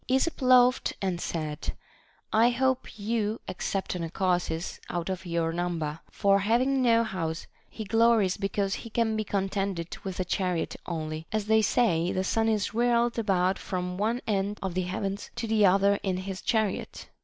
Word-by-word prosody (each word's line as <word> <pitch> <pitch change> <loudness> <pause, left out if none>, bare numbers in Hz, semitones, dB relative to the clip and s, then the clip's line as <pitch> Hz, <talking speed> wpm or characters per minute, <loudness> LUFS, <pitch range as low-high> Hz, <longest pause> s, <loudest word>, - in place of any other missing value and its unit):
Esop 265 +5 +1
laughed 255 -1 +5
and 185 -3 -2
said: 155 -3 -3 0.6
I 225 +2 +5
hope 260 -1 0
you 215 0 -1
except 185 +1 -3
Anacharsis 175 -1 -1
out 175 +1 -3
of 185 0 -5
your 165 -1 0
number; 165 -3 -2
for 200 -1 +3
having 250 +6 +2
no 230 -2 +4
house, 165 -7 -3 0.2
he 220 - -6
glories 225 -3 +3
be 195 -1 -2
cause 200 -1 -1
he 230 - -6
can 225 -1 +1
be 215 - 0
contented 195 -3 -2
with 190 -2 -5
a 185 - 0
chariot 180 -2 -1
only, 155 -1 -4
as 215 -2 -1
they 220 +1 +4
say 185 -6 +2
the 185 - 0
sun 225 +3 +1
is 215 -2 0
whirled 235 0 +2
about 190 -3 +1
from 180 -1 -3
one 225 +6 0
end 205 0 -1
of 190 -2 -2
the 185 - 0
heavens 195 +2 -3
to 235 -1 -3
the 215 -2 +4
other 200 +2 +3
in 185 -2 -1
his 190 0 -5
chariot. 220 -4 -1
195 Hz, 170 wpm, -28 LUFS, 180-225 Hz, 0.6 s, laughed